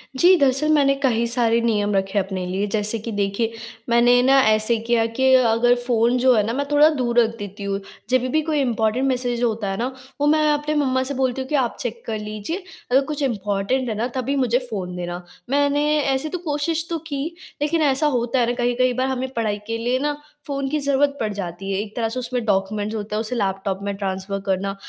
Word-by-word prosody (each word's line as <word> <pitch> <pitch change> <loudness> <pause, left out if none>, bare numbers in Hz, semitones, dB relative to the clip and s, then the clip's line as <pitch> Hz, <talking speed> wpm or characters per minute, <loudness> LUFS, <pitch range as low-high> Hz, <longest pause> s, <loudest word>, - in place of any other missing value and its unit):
जी, 350 +8 +6
दरअसल, 275 +1 +2
मैंने 285 -3 +4
कही 235 -3 +2
सारे 235 -1 +2
नियम 210 -3 +1
रखे 195 +1 0
अपने 190 -1 -3
लिए 190 +3 -1
जैसे 210 +1 +1
कि 225 +2 -6
देखिए 205 +3 -1 0.4
मैंने 240 +1 +5
ना 270 +1 +5
ऐसे 215 +2 +3
किया 230 0 +1
कि 265 0 +5
अगर 240 -1 +4
फ़ोन 240 0 +2
जो 255 +1 +4
है 210 - +3
ना 225 - -2
मैं 285 +3 -1
थोड़ा 295 +1 +6
दूर 240 -2 +2
रख 230 -1 +2
देती 205 0 -7
हूँ। 200 0 -2 0.3
जब 255 0 +3
भी 255 - -2
भी 310 +4 +2
कोई 300 - +1
इंपोर्टेंट 235 +1 +1
मैसेज 245 -2 -1
होता 220 -3 0
है 195 - -3
ना, 240 +4 -1 0.3
वो 290 - +3
मैं 305 0 +3
अपने 295 +1 -1
मम्मा 260 -3 +1
से 270 +2 -4
बोलती 260 -1 -1
हूँ 260 - -6
कि 300 - 0
आप 235 - -4
चेक 235 -1 -4
कर 220 -2 -3
लीजिए। 215 - -5 0.3
अगर 265 +2 +5
कुछ 300 -2 -3
इंपोर्टेंट 210 +2 -1
है 220 - -2
ना 225 +3 -1
तभी 265 +2 -1
मुझे 250 -3 +2
फ़ोन 185 -4 -4
देना। 175 0 -5 0.3
मैंने 285 +1 +2 0.2
ऐसे 275 +2 0
तो 360 - -3
कोशिश 310 +2 -1
तो 335 - -1
की 280 -3 -3 0.4
लेकिन 315 +2 +1
ऐसा 285 +1 +2
होता 245 +1 0
है 240 - +3
ना 240 - +1
कई-कई 245 +1 +1
बार 255 +2 0
हमें 260 0 -2
पढ़ाई 220 -4 -1
के 230 - -2
लिए 245 +3 0
ना 295 +1 0 0.3
फ़ोन 275 -1 -2
की 300 +2 0
ज़रूरत 280 0 +1
पड़ 215 -2 -1
जाती 195 0 -5
है। 195 - 0
एक 210 -1 -9
तरह 230 -2 -1
से 245 +3 -4
उसमें 245 -1 -3
डॉक्यूमेंट्स 205 +1 -1
होते 210 0 -4
हैं - - 0
उसे 230 +3 -4
लैपटॉप 195 -2 -1
में 200 0 -3
ट्रांसफर 195 0 -3
करना। 195 +1 -1
240 Hz, 225 wpm, -22 LUFS, 210-270 Hz, 0.4 s, जी